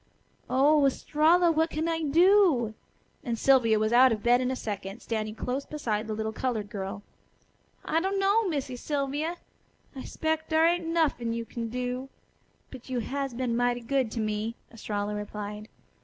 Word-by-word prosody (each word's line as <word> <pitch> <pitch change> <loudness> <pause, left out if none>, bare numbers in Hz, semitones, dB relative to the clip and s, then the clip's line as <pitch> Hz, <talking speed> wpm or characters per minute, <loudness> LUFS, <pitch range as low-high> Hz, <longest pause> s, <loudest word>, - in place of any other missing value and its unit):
"Oh, 285 +3 +4
Estralla! 320 +5 +3
What 320 +1 +1
can 315 +1 -2
I 325 -1 -1
do?" 325 - +4 0.5
and 235 -1 -2
Sylvia 235 -4 +4
was 215 +2 0
out 255 +1 +7
of 215 -2 -2
bed 245 +1 +4
in 255 - 0
a 260 - -1
second, 205 -2 -5
standing 215 -2 -3
close 255 +4 -3
beside 225 -9 -3
the 215 - -3
little 220 0 -2
colored 220 -4 -3
girl. 195 0 -5 0.8
"I 320 - +1
dunno, 395 +3 +2
Missy 280 -6 -3
Sylvia. 290 +5 -2 0.6
I 265 - -6
'spec' 315 0 -2
dar 320 0 +4
ain't 340 0 +1
nuffin' 305 -8 0
you 230 0 -3
kin 230 0 -5
do. 250 +2 -4 0.6
But 260 -1 -11
you 250 -2 -1
has 275 +2 -3
been 245 -1 -1
mighty 245 0 +1
good 260 0 0
to - - -3
me," 215 +1 -2 0.2
Estralla 210 -2 -3
replied. 210 0 -6
250 Hz, 165 wpm, -28 LUFS, 220-310 Hz, 0.8 s, out